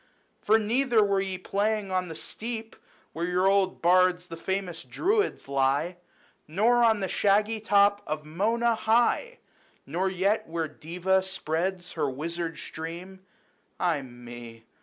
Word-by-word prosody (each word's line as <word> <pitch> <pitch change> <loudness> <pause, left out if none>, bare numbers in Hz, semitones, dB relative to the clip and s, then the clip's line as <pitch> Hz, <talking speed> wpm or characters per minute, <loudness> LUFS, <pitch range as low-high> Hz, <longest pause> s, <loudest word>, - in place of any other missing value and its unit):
For 220 +2 +4
neither 230 +1 +2
were 200 -1 +1
ye 190 -1 -3
playing 205 +2 -1
on 185 -1 0
the 160 - -7
steep 225 +3 -5 0.4
Where 170 +2 -2
your 180 +1 +1
old 195 -2 +2
bards, 180 0 +3
the 165 - -6
famous 180 -1 -3
Druids, 395 - 0
lie, 140 +6 +1 0.5
Nor 225 +9 +3
on 220 -3 +4
the 190 - 0
shaggy 210 +3 +2
top 205 -1 +3
of 150 0 -3
Mona 225 +9 +1
high, 240 - +1 0.5
Nor 180 +7 -1
yet 200 +4 0
where 165 0 -2
Deva 180 +5 0
spreads 185 -1 -3
her 150 -4 -1
wizard 165 +4 -4
stream. 170 +4 -7 0.6
Ay 170 -5 +1
me 120 -2 -11
185 Hz, 140 wpm, -27 LUFS, 165-210 Hz, 0.6 s, For